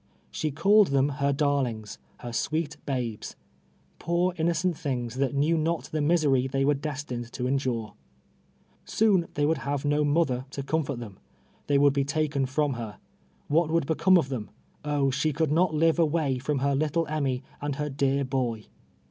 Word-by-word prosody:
She 155 - -2
called 200 +7 +4
them 140 0 +2
her 140 0 0
darlings 130 - -1
— 65 - -34
• - - -18
her 120 -1 -6
sweet 155 +5 -1
babes 125 -6 -3 0.3
— - - -37
poor 175 +2 +1
innocent 170 +1 0
things, 125 -5 -3
that 140 +1 0
knew 150 +4 +2
not 165 +1 0
the 155 - -1
misery 145 -5 +2
they 135 +1 0
were 145 - +4
destined 140 -5 -5
to 125 - -3
endure. 125 -5 -1 0.9
Soon 200 -6 +2
they 145 - +2
would 155 -1 +1
have 140 +2 -3
no 145 +1 +2
mother 145 -4 +1
to 140 0 -5
comfort 140 -2 -1
them 110 -5 -9 0.2
— - - -35
they 145 - +3
would 140 0 +4
l)e 140 - +2
taken 145 -1 0
from 145 +1 0
her. 115 -4 -6 0.5
AVhat 160 +1 +3
would 165 -2 +1
become 180 +5 +4
of 135 -6 0
them? 120 -6 -4 0.3
Oh 145 -2 +1
I - - 0
she 140 +4 0
could 155 0 0
not 165 0 +2
live 165 +2 +3
av^'ay 150 -5 +1
from 145 +2 -1
her 140 - +2
little 155 +4 0
Emmy 140 -4 -1 0.2
and 145 -1 -2
her 150 +1 -3
dear 140 0 +1
boy. 125 -4 -2
145 Hz, 190 wpm, -27 LUFS, 130-155 Hz, 0.9 s, called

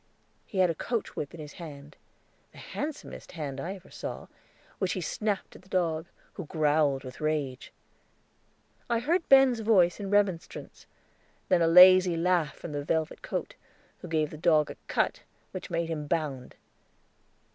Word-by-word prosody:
He 200 - -7
had 185 -2 +4
a - - -2
coach 230 +7 -3
whip 145 - -4
in - - -11
his 150 -1 -8
hand 145 -2 -10 0.6
the - - -16
handsomest 300 0 -6
hand 145 -5 -5
I 185 +6 -4
ever 190 -2 -15
saw, - - -6 0.5
which 190 -2 0
he - - -3
snapped 205 +3 -2
at - - -13
the 190 - -22
dog, 165 -3 0 0.3
who 180 - -7
growled 150 -3 +2
with 130 +2 -10
rage. 150 -4 -2 1.2
I 235 - +2
heard 335 +9 0
Ben's 270 -3 +6
voice 200 -6 +3
in 200 -1 -4
remonstrance; 200 -4 -1 0.6
then 180 -2 +4
a 165 - +4
lazy 180 0 +8
laugh 170 -3 +1
from 170 - -8
velvet 160 +2 -1
coat, - - -4 0.5
who 180 - -9
gave 155 -2 0
the 155 - -8
dog 155 -3 +3
a - - -11
cut - - 0 0.3
which 185 - -7
made 170 -1 -1
him 155 -3 -4
bound. 145 -6 -2
170 Hz, 160 wpm, -28 LUFS, 155-190 Hz, 1.2 s, lazy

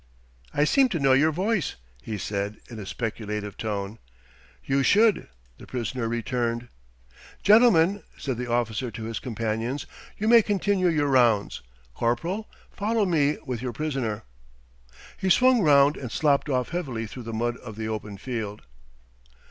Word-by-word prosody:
"I 145 - +2
seem 265 - +4
to 170 - -2
know 135 -2 +4
your 150 +4 +4
voice," 190 +1 -1 0.3
he 105 - -5
said 100 +1 -3
in 115 - -7
a 100 - -7
speculative 105 -3 -4
tone. 105 0 -4 0.7
"You 135 +1 +2
should," 210 - +3 0.3
the - - -12
prisoner 125 -1 -3
returned. 120 0 -2 0.7
"Gentlemen," 205 -4 +5 0.2
said 130 -4 -3
the 125 -1 -4
officer 120 0 0
to 110 0 -8
his 115 0 -4
companions, 115 +3 -3 0.3
"you 215 - -2
may 235 0 +8
continue 200 -2 +1
your 155 -4 +2
rounds. 120 -7 +2 0.3
Corporal, 165 - -1 0.2
follow 215 +1 0
me 150 -5 +2
with 125 -4 -4
your 125 -2 -3
prisoner." 135 -9 -3 0.9
He 190 - -1
swung 255 +4 +5
round 145 -3 +5
and 125 -4 -6
slopped 145 +1 +2
off 125 -2 0
heavily 135 -10 -3
through 125 +4 -8
the - - -3
mud 120 +2 -1
of 110 -4 -10
the 110 0 -4
open 105 -2 -5
field. 110 -3 -5
125 Hz, 150 wpm, -26 LUFS, 115-165 Hz, 0.9 s, may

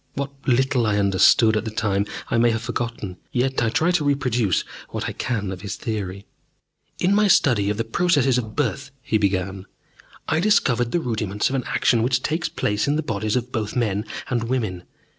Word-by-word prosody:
What 140 0 -3 0.2
little 130 -2 +2
I 105 -1 +1
understood 100 +3 +4
at 105 - 0
the 115 - -4
time 100 -2 0 0.2
I 115 - +2
may 120 0 +5
have 115 0 -1
forgotten, 115 -6 -4
yet 130 +1 0
I 115 - +2
try 165 +9 +2
to 175 -4 +1
reproduce 125 - +1 0.3
what - - -4
I - - -2
can 105 -6 -2
of 90 -2 -7
his 100 - -5
theory. 100 -4 -4 0.7
"In 180 +3 +2
my 210 +1 +4
study 115 - +3
of 105 - -1
the 115 - 0
processes 135 0 +2
of 110 -3 -6
birth," 140 0 -1
he 110 - +1
began, 95 -1 -1 0.6
"I - - +1
discovered 140 - +2
the 175 - +1
rudiments 105 -6 -1
of 135 - -2
an 130 - -2
action 115 -2 +2
which 125 +1 +1
takes 160 +3 -1
place 105 +3 -1
in 145 - +2
the 155 - -1
bodies 110 -4 -2
of 125 0 -2
both 110 -4 -3
men 105 -3 0 0.2
and 120 -2 -1
women. 110 -8 -2
115 Hz, 200 wpm, -23 LUFS, 105-135 Hz, 0.7 s, may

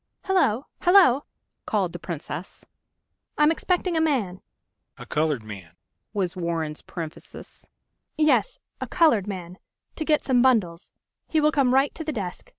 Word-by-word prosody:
"Hello, 285 - +2
hello," 350 -8 +5 0.4
called - - 0
the - - -6
Princess. - - -7 0.7
"I'm 300 +1 +5
expecting 360 +1 0
a 320 - +2
man." 235 - 0 0.6
"A - - -9
colored 150 -6 0
man," 100 -6 -10 0.4
was 190 -4 -2
Warren's 165 -3 -3
parenthesis. 160 -3 -9 0.5
"Yes,... 310 +11 +2 0.2
a - - -3
colored 300 - +3
man... 185 -2 -7 0.4
to 315 - -2
get 305 -1 +1
some 250 -3 +3
bundles. 205 -10 +1 0.4
He 315 - +1
will 305 0 +3
come 275 -4 +2
right 270 +1 +3
to 320 - -6
the 310 - -3
desk 195 -9 -6
245 Hz, 145 wpm, -25 LUFS, -, 0.7 s, hello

